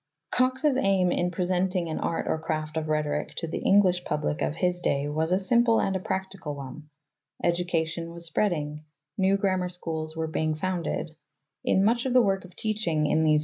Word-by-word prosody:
Cox's 260 +2 +2
aim 195 -6 +3
in 175 - +1
presenting 180 0 0
an 160 - -3
Art 165 - -1
or 160 - 0
Craft 155 -1 -3
of 160 -1 -2
Rhetoric 150 -1 -1
to 165 - -3
the 160 - -4
Eng 200 +1 +6
lish 180 -2 +1
public 150 -2 -2
of 150 - 0
his 180 +1 +1
day 140 -4 0
was 160 +3 -1
a 185 - +4
simple 230 +4 +3
and 190 -1 0
practical 190 -6 -4
one. 140 +2 -9 0.5
Education 170 -1 0
AimandPlan 170 - -9
was 170 0 -3
spreading; 155 -5 -1 0.4
new 190 +1 +4
grammar 185 -2 0
schools 160 -3 -5
were 160 0 -1
being, 155 0 -1
of - - -4
Cox's 155 - -12
founded; 170 -3 -2 0.5
in 190 - +3
much 235 +4 +2
of 250 - -1
the 255 - +7
work 195 -2 0
of 180 - -15
teaching 205 -8 0
in 155 - +2
these 155 - +3
Rhetoric. 150 - +4
175 Hz, 205 wpm, -27 LUFS, 155-190 Hz, 0.5 s, the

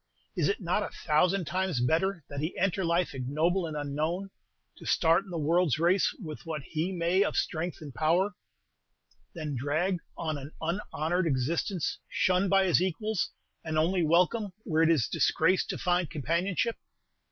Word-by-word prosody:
Is 170 -6 +1
it 200 - 0
not 185 +1 0
a - - -3
thousand 180 +4 +1
times 185 -3 -1
better 165 +8 +1
that 140 - -6
he 155 +4 -3
enter 190 0 +1
life 170 0 +1
ignoble 155 +8 0
and 155 -1 -5
unknown, 155 +7 -2 0.5
to - - -13
start 165 +3 +3
in - - -13
the 175 - -4
world's 165 0 +2
race 175 +4 +3
with 155 -7 -7
what 155 -4 -4
he 160 +6 -2
may 175 +1 +1
of - - -2
strength 170 +1 -2
and 145 -4 -8
power, 170 - +2 1.0
than 155 -4 -4
drag 155 +8 0 0.2
on 155 -3 -2
an 140 +3 -9
unhonored 170 0 -1
existence, 160 +6 -1
shunned 185 +1 +2
by 195 0 +4
his 180 -2 +3
equals, 195 +3 -1 0.3
and 160 -1 -2
only 175 +4 +2
welcome 180 +5 +2
where 160 -3 +1
it 165 - +5
is 150 -9 +3
disgrace 185 +3 +2
to - - -3
find 175 -2 +1
companionship?" 170 - -1
170 Hz, 165 wpm, -29 LUFS, 155-185 Hz, 1.0 s, it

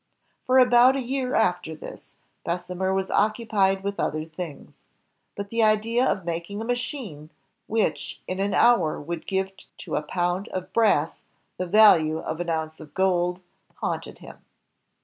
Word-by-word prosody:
For 255 +1 +4
about 250 +1 +6
a - - 0
year 260 0 -2
after 180 -6 +1
this, - - -11 0.3
Bessemer 180 +2 -2
was 190 0 -1
occupied 210 -3 +1
with 200 +1 -3
other 155 +1 -1
things. 160 -2 -9 0.6
But 200 0 -6
the 230 0 +1
idea 220 +3 +3
of 190 -8 0
making 170 +4 -4
a 225 - -4
machine 245 - -4 0.4
which 220 0 -1
in 185 +1 -3
an 200 +1 0
hour 235 -10 +4
would 165 +2 -6
give 190 0 -1 0.3
to 165 - -5
a - - +1
pound 175 +4 -2
of 185 -1 -6
brass 200 -9 +2 0.4
the 180 - -3
value 170 -6 +6
of 160 0 -5
an 175 -1 -3
ounce 160 -1 -3
of 155 -2 -13
gold 180 -1 +1 0.3
haunted - - -4
him. - - -13
190 Hz, 155 wpm, -25 LUFS, 170-220 Hz, 0.6 s, about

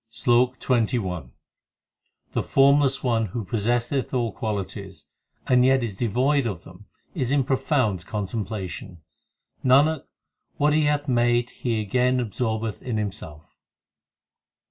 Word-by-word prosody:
SLOK 125 +2 +2
XXI 115 - 0 1.0
The - - 0
Formless 140 0 +3
One 115 -3 +1
who 110 +3 -5
possesseth 120 +5 -1
all 120 -3 0
qualities, 100 -5 -5 0.4
and 125 -1 +4
yet 130 0 +4
is 110 -4 -3
devoid 125 +5 +1
of 95 -6 -5
them 95 +3 -15 0.3
is 130 -7 -2
in 140 -1 +3
profound 130 - 0
contemplation; 100 -4 -5 0.6
Nanak, 140 +4 +4 0.5
what 150 +1 +3
He 155 0 +3
hath 145 0 0
made 120 -1 +2
He 115 -3 -2
again 125 +5 +1
absorbeth 110 -2 -2
in 120 -4 -3
Him 105 -2 -1
self. 80 -6 -11
120 Hz, 120 wpm, -24 LUFS, 105-130 Hz, 1.0 s, and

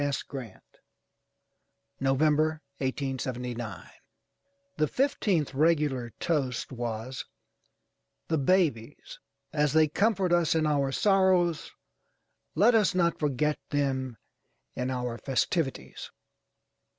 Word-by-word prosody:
S. 145 -2 -1
GRANT, 125 -7 -10 1.2
NOVEMBER, 150 +3 +2 0.2
1879 125 - -4 0.9
The 155 - +2
fifteenth 195 - 0
regular 145 -5 +1
toast 135 -8 -1
was 120 +1 -4 1.0
“The 160 -2 +1
Babies. 155 - 0 0.3
As 150 -2 +1
they 155 0 +5
comfort 195 +2 +1
us 170 -2 +3
in 160 -1 +2
our 140 -3 +1
sorrows, 185 -2 +2 0.9
let 210 +9 +5
us 215 -5 +3
not 170 -2 +2
forget 150 0 0
them 130 -4 -1 0.6
in 125 +1 -2
our 125 -2 -3
festivities. 135 - -2
145 Hz, 90 wpm, -28 LUFS, 130-165 Hz, 1.2 s, they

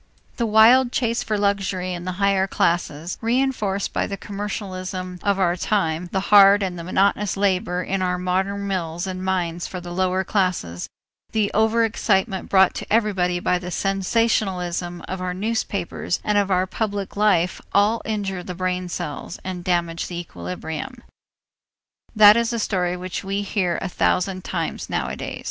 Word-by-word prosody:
The 235 - 0
wild 235 +4 +6
chase 235 -2 0
for 215 -2 -1
luxury 195 -2 0
in 175 0 -6
the 185 - -2
higher 195 0 +2
classes, 170 -2 -1
reënforced 230 -5 0
by - - 0
the 200 - -5
commercialism 185 -3 -5
of 200 -1 +1
our 180 -2 +2
time, 180 -3 -1
the 195 +1 -2
hard 200 0 +8
and 185 -2 -2
monotonous 195 +4 0
labor 185 -2 0
in 195 +1 -2
our 180 -1 0
modern 190 +3 -1
mills 175 -3 -2
and 185 -1 -5
mines 175 -3 -1
for 185 - -6
the 175 0 -8
lower 185 +1 +1
classes, 180 - -1 0.4
the 215 -2 +1
over 220 +2 +3
excitement 195 -3 0
brought 190 -1 +5
to - - -7
everybody 190 -5 +2
by 180 0 +1
the 180 0 -6
sensationalism 185 -3 0
of 185 0 -4
our 180 0 -3
newspapers 200 -4 -2
and 210 - 0
of 200 -1 +2
our 185 -1 +2
public 200 0 -3
life 195 -4 +2
all 210 +3 +3
injure 200 -4 -3
the 180 0 -7
brain 180 0 -2
cells 150 +1 -5
and 185 -2 -5
damage 170 -2 -1
the 175 -1 -5
equilibrium. 160 - -6 1.1
That 210 -1 +9
is 235 0 +1
a 235 - -1
story 180 -5 -1
which 185 +1 -5
we 195 +1 -2
hear 185 -4 0
a - - -1
thousand 185 0 0
times - - -3
nowadays. - - -3
190 Hz, 160 wpm, -22 LUFS, 180-205 Hz, 1.1 s, That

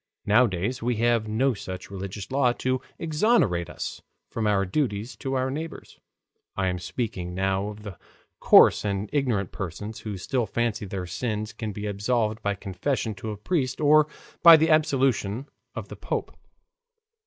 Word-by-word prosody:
Nowadays 105 +1 +2
we 120 +1 0
have 115 -1 +2
no 125 +5 +1
such 95 -2 -7
religious 100 +2 -6
law 130 -3 +3
to 130 +1 -1 0.2
exonerate 150 - +2
us - - -6 0.3
from 110 -2 -1
our 100 -2 +2
duties 110 +1 -2
to 135 -1 -3
our 130 0 0
neighbors 160 +4 -7 0.6
(I 95 -1 +1
am 90 - -2
not - - -10
speaking 90 -1 -4
now 95 +1 0
of 105 0 -8
the 100 -4 -8 0.4
coarse - - +6
and 100 0 -2
ignorant 120 -10 0
persons 105 +5 -6
who 105 -3 -5
still 120 +5 -1
fancy 115 -2 -1
their 95 -1 -4
sins 110 +4 -3
can 110 0 -5
be 105 +1 -6
absolved 105 +2 -1
by 100 0 -1
confession 105 +6 -2
to 105 +3 -7
a 105 - -5
priest 130 - -1
or 155 0 +5 0.3
by 170 -1 +10
the 160 +1 +2
absolution 135 -7 +2 0.3
of - - -6
the - - -7
Pope). - - -4
110 Hz, 165 wpm, -26 LUFS, 100-130 Hz, 0.6 s, by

